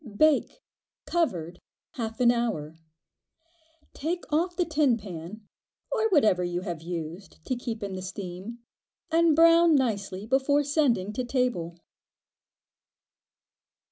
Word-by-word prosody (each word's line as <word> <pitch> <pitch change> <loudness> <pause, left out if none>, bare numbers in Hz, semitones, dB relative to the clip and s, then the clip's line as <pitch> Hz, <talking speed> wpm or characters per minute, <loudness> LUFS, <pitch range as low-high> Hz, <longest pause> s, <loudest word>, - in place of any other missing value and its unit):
Bake, 310 - +2 0.4
covered, 180 - -1 0.3
half 225 -6 -5
an 240 -1 +5
hour. 220 -11 -2 1.2
Take 345 +4 -3
off 350 +3 +1
the 355 - +1
tin 300 -6 +2
pan, 195 +1 -9 0.4
or 445 -3 +1
whatever 220 - +3
you 175 0 -2
have 170 -3 -5
used 170 +1 -7
to 255 - -1
keep 235 -3 -5
in 200 -1 -4
the 185 - -5
steam, 190 +4 -7 0.5
and 330 -1 +4
brown 335 0 +6
nicely 200 -7 -1
before 270 +4 +2
sending 265 - +1
to 255 - -2
table. 240 -10 -1
235 Hz, 115 wpm, -27 LUFS, 185-300 Hz, 1.2 s, brown